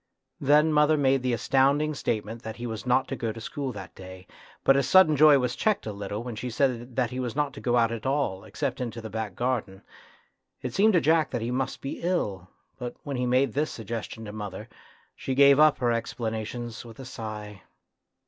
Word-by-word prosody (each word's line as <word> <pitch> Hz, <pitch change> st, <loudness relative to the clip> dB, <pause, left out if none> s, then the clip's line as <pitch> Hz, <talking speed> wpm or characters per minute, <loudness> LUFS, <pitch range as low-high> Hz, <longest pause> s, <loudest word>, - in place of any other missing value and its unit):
Then 150 Hz, +3 st, +4 dB
mother 150 Hz, +1 st, +4 dB
made 135 Hz, -2 st, +3 dB
the 125 Hz, 0 st, 0 dB
astounding 135 Hz, +5 st, +2 dB
statement 115 Hz, -4 st, -3 dB
that 110 Hz, -1 st, -6 dB
he 120 Hz, -, -6 dB
was 115 Hz, +1 st, -5 dB
not 130 Hz, +2 st, +3 dB
to 135 Hz, -, -2 dB
go 115 Hz, -3 st, -2 dB
to 115 Hz, -, -9 dB
school 135 Hz, +4 st, -4 dB
that 95 Hz, -3 st, -9 dB
day, 95 Hz, 0 st, -11 dB, 0.4 s
but 135 Hz, -, +5 dB
his 135 Hz, -2 st, +1 dB
sudden 185 Hz, -3 st, +6 dB
joy 150 Hz, 0 st, +7 dB
was 125 Hz, -2 st, -1 dB
checked 215 Hz, -2 st, 0 dB
a 110 Hz, -, -4 dB
little 100 Hz, +2 st, -5 dB
when 120 Hz, -2 st, -6 dB
she 125 Hz, +4 st, -4 dB
said 120 Hz, -1 st, -1 dB
he 130 Hz, -, -4 dB
was 125 Hz, -2 st, -3 dB
not 145 Hz, -2 st, 0 dB
to -, -, -9 dB
go 120 Hz, -1 st, +1 dB
out 115 Hz, -1 st, +3 dB
at 115 Hz, +2 st, -4 dB
all, 135 Hz, -9 st, -1 dB
except -, -, -4 dB
into 120 Hz, -2 st, -4 dB
the 110 Hz, -2 st, -8 dB
back 110 Hz, -3 st, -4 dB
garden. 115 Hz, -6 st, -2 dB, 0.8 s
It 125 Hz, -2 st, -4 dB
seemed 215 Hz, +6 st, +4 dB
to 175 Hz, -, +4 dB
Jack 160 Hz, 0 st, +3 dB
that 115 Hz, -, -3 dB
he 120 Hz, -, -2 dB
must 130 Hz, +1 st, -2 dB
be 135 Hz, -, -5 dB
ill, 105 Hz, -, -2 dB, 0.3 s
but 120 Hz, -1 st, -5 dB
when 140 Hz, -2 st, -4 dB
he 125 Hz, 0 st, 0 dB
made 125 Hz, -1 st, +2 dB
this 150 Hz, +3 st, 0 dB
suggestion 110 Hz, 0 st, -6 dB
to 105 Hz, -, -7 dB
mother, 105 Hz, 0 st, -7 dB, 0.5 s
she 130 Hz, -, -3 dB
gave 140 Hz, +1 st, +6 dB
up 155 Hz, -1 st, +6 dB
her 120 Hz, -2 st, +1 dB
explanations 115 Hz, 0 st, -4 dB
with 115 Hz, -2 st, -12 dB
a 135 Hz, -, -8 dB
sigh. 105 Hz, -5 st, -7 dB
125 Hz, 215 wpm, -27 LUFS, 110-140 Hz, 0.8 s, joy